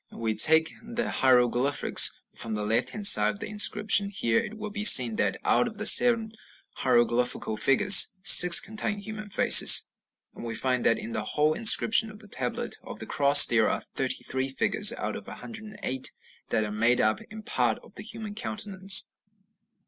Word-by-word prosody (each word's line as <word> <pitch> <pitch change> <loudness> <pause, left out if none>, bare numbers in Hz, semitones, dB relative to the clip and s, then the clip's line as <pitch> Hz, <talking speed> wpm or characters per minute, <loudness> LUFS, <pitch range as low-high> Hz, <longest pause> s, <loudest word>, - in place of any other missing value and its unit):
We 110 -1 -7
take 160 +6 +2
the 235 +1 -7
hieroglyphs 125 +1 +1
from 110 -1 -5
the 105 0 -4
left 110 +2 -2
hand 210 -1 -7
side 105 - +5
of - - -19
the - - -8
inscription. 210 -1 0
Here 115 - -4
it 215 +1 -10
will 215 -1 -10
be 205 0 -6
seen 125 - +5
that, 100 -2 -3
out 245 - -1
of 215 -2 -4
seven 230 -2 +5 0.5
hieroglyphical 120 -2 -3
figures, 195 - +4
six 180 -1 +7
contain 215 0 -6
human 215 +1 -12
faces. - - +5 0.4
And - - -15
we 115 -1 -9
find 125 0 -4
that 115 - -1
in 115 - -11
the 110 - -6 0.2
whole 150 +1 -1
inscription 225 +2 0
of 210 - -16
the 210 0 -19
Tablet 125 -10 -7
of - - -14
the - - -10
Cross 145 0 +4
there 115 -2 -2
are - - -6
33 130 +1 -6
figures 205 +10 0
out - - -8
of - - -13
108 215 - -6 0.4
that 110 - -3
are 105 - -8
made 115 +3 -2
up 110 0 -2
in 220 0 -14
part - - -4
of - - -22
the - - -11
human 215 -2 -11
countenance. 200 -3 -1
160 Hz, 175 wpm, -23 LUFS, -, 0.5 s, six